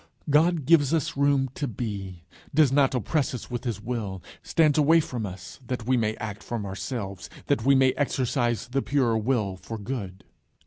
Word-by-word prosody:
God 160 0 +3
gives 155 -1 +4
us 155 - -1
room 140 -2 +2
to 145 - -3
be; 100 -6 -5 0.3
does 150 -4 +5
not 135 -1 +3
oppress 130 - 0
us 125 - -8
with 120 +1 -4
his 115 -3 -2
will; 105 -6 -4 0.2
"stands 155 -2 +3
away 160 +3 +5
from 120 -8 -3
us," 90 -3 -9
that 125 -3 -3
we 130 +2 +2
may 110 -2 0
act 105 -2 -6
from 115 -1 -4
ourselves, 100 -1 -5 0.2
that 110 - +1
we 140 0 +6
may 130 -1 +5
exercise 125 -5 0
the 135 +2 0
pure 130 -6 +1
will 110 -4 0
for 115 +4 -7
good. 100 -4 -6
125 Hz, 180 wpm, -26 LUFS, 105-140 Hz, 0.3 s, we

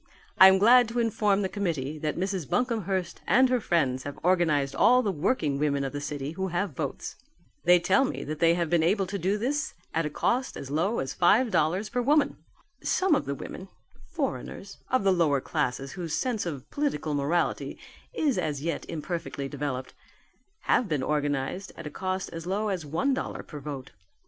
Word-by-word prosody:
I 190 - +11
am 190 0 +6
glad 240 +4 +6
to 235 - -5
inform 210 -3 +2
the - - +1
committee 155 -8 -3
that 150 0 -2
Mrs. 190 -4 -2
Buncomhearst 200 -8 -1
and 255 +4 +5
her 250 -1 +2
friends 135 -10 +1
have 145 +2 -7
organized 160 -6 +2
all 250 +1 +5
the 205 - +1
working 155 - 0
women 140 -2 +1
of 135 - -4
the 145 - -4
city 145 -1 -4
who 190 +3 -3
have 180 +1 -1
votes. 140 0 -5 0.5
They 180 0 +7
tell 190 +8 +3
me 270 - -3
that 155 +1 -5
they 165 +1 +4
have 170 -1 0
been 170 +1 +2
able 195 +4 +2
to 195 +2 -4
do 195 +4 +1
this 280 +7 -2 0.2
at 165 -1 0
a - - -4
cost 255 - -1
as 140 - -7
low 180 +10 +1
as 135 +1 -2
five 220 +7 +4
dollars 180 +7 +1
per 245 +3 -1
woman. 285 +3 +2 0.5
Some 375 -3 +2
of 290 - +1
the 140 - -2
women 185 +6 -8 0.4
foreigners 65 - -4
of 255 -4 +2
the 195 -1 +4
lower 155 -6 +2
classes 135 +1 -2
whose 170 -4 -4
sense 235 -8 -1
of 140 -5 -6
political 285 - -1
morality 145 +5 0 0.3
is 295 - 0
as 150 -4 -2
yet 165 0 -3
imperfectly 165 -3 -4
developed 135 -2 -4 0.7
have 235 - +2
been 150 -4 0
organized 145 +5 -2
at 170 - -8
a 150 - -5
cost 185 0 -3
as 165 0 -6
low 205 +3 0
as 180 -6 -3
one 170 - +1
dollar 265 - -4
per 150 - -9
vote. 140 -2 -7
175 Hz, 195 wpm, -27 LUFS, 145-205 Hz, 0.7 s, I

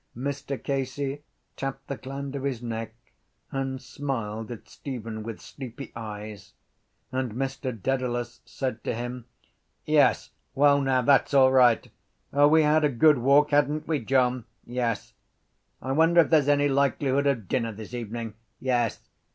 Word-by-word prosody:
Mr 140 +1 -3
Casey 135 +1 -2 0.3
tapped 135 0 -5
the 140 - -4
gland 135 +1 -6
of 140 - -3
his 130 -3 -3
neck 115 -1 -4 0.6
and 135 -1 -2
smiled 115 -6 -4
at 120 - -9
Stephen 115 -5 -6
with 115 0 -6
sleepy 130 0 -9
eyes: 105 -2 -8 0.6
and 130 -4 -2
Mr 135 +1 -3
Dedalus 120 0 -2
said 130 -4 -4
to - - -2
him: 120 +1 -5 0.6
—Yes. - - +3 0.2
Well 140 0 +5
now, 130 -2 +2
that’s 140 +2 +4
all 130 -1 +7
right. 125 -3 +5 0.5
O, 145 +1 +6
we 160 +1 +5
had 150 +1 +3
a 150 - +4
good 145 +2 +4
walk, 140 +4 +4
hadn’t 145 +1 +2
we, 155 -2 +1
John? 125 -1 +1 0.2
Yes... 120 -3 -2 0.7
I 130 - -2
wonder 165 +4 +5
if 160 - -1
there’s 150 -3 +4
any 145 0 +4
likelihood 140 0 +1
of 120 -8 0
dinner 115 -1 0
this 110 +2 -10
evening. 115 -1 -5 0.3
Yes... 120 -3 -1
130 Hz, 150 wpm, -26 LUFS, 120-140 Hz, 0.7 s, all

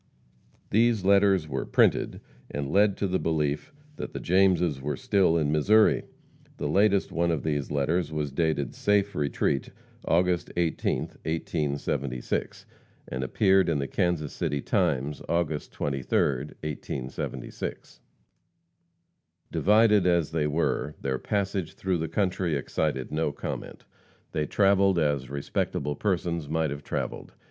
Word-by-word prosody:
These 115 -2 +3
letters 100 -4 +4
were 65 -3 -2
printed, - - +2 0.3
and 70 -1 -4
lead 100 0 +4
to 100 - 0
the 95 0 0
belief 75 -2 -1 0.3
that - - -6
the - - -4
Jameses 90 -5 +2
were 75 +2 -2
still 100 -9 +2
in 75 -3 +1
Missouri. 105 +9 +4 0.5
The 75 - -2
latest 100 +4 +3
one 85 +1 +1
of 80 -4 -1
these 75 -3 -1
letters 75 +3 0
was 75 -2 -2
dated 70 -3 0
"Safe 100 0 +1
Retreat, 70 -1 0 0.3
August 90 +1 +1
18th, 85 -2 -1
1876," 70 -5 -2 0.4
and 65 +1 -3
appeared 95 - +3
in 80 - +1
the 70 - -1
Kansas 85 -3 -1
City 70 - -1
Times 70 +1 0
August 80 -3 -1
23d, 70 -3 -3 0.5
1876. 70 -3 -5 1.5
Divided 105 -2 +4
as 85 -3 +2
they 80 -2 0
were, 75 -1 -1
their 65 -1 -2
passage 100 -4 -2
through 95 -2 -1
the 80 - -2
country 90 -1 0
excited 70 -1 -2
no 75 -1 0
comment. - - -6 0.5
They 75 -1 -1
travelled 100 -2 +3
as 75 -5 0
respectable 70 +1 -2
persons 85 -5 -1
might 80 -2 0
have 70 0 -6
travelled. - - -4
80 Hz, 130 wpm, -27 LUFS, 75-95 Hz, 1.5 s, letters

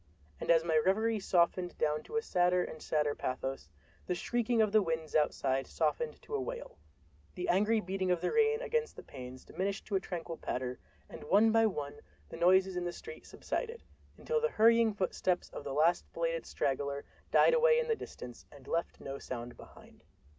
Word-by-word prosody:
And - - -6
as 165 -1 +5
my 160 -2 +3
reverie 220 +3 +2
softened 180 -1 +1
down 150 0 0
to - - -8
a 450 - +1
sadder 180 - +2
and 155 - -8
sadder 150 -2 0
pathos, 130 +1 -4 0.4
the 180 - 0
shrieking 240 +4 0
of 215 -2 +4
the 215 0 +5
winds 160 -4 -3
outside 135 -3 +1
softened 475 -1 -1
to 450 - -10
a 430 - 0
wail, - - -6 0.6
the 360 - -3
angry 220 - +3
beating 190 -1 -2
of 180 -1 +2
the 180 - -1
rain 450 0 +3
against 465 -1 -1
the - - -10
panes 130 -1 -10
diminished 195 +2 -3
to 205 - -2
a - - +3
tranquil 170 -3 -6
patter, 125 0 -4 0.3
and - - -10
one 215 +3 +5
by 225 0 +5
one 145 -8 -5 0.3
the - - -8
noises 185 +2 +4
in 180 - -1
the 175 - -2
street 455 - -10
subsided, 465 -1 -4 0.3
until 470 -1 -1
the 470 - +2
hurrying 230 - +5
footsteps 185 -2 -1
of - - -7
the 140 - -5
last 160 +5 +2
belated 165 0 -2
straggler 140 +1 -2 0.2
died - - +5
away 485 0 +5
in 480 0 +1
the 455 - +2
distance 125 - -10
and 140 -2 -15
left 170 +1 -2
no 135 0 -6
sound 120 -1 -6
behind. - - -16
180 Hz, 190 wpm, -32 LUFS, 155-230 Hz, 0.6 s, as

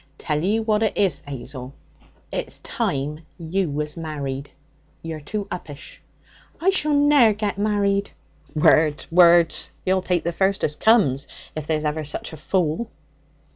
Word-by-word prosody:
'Tell 150 -1 -2
you 215 +4 +1
what 215 -1 +1
it 220 - 0
is, 185 -8 +2
'Azel; 130 0 -7 0.6
it's - - -3
time 145 +3 -3
you 175 +1 -1
was 150 +1 -3
married. 145 -4 -5 0.5
You're 160 -2 -5
too 205 +6 -4
uppish.' 150 -5 -8 0.6
'I 375 +4 +3
shall 305 -6 +1
ne'er 285 -6 +5
get 205 -2 -3
married.' 200 -1 +1 0.5
'Words! 150 0 +3
words! 170 -1 +5 0.2
You'll 185 0 +2
take 180 -2 0
the 170 - -1
first 190 +3 0
as 150 - 0
comes 150 - +3 0.3
if 155 -1 -5
there's 155 -1 0
ever 155 +1 -1
such 150 +2 -5
a - - -8
fool.' 180 +6 -1
170 Hz, 145 wpm, -23 LUFS, 150-205 Hz, 0.6 s, ne'er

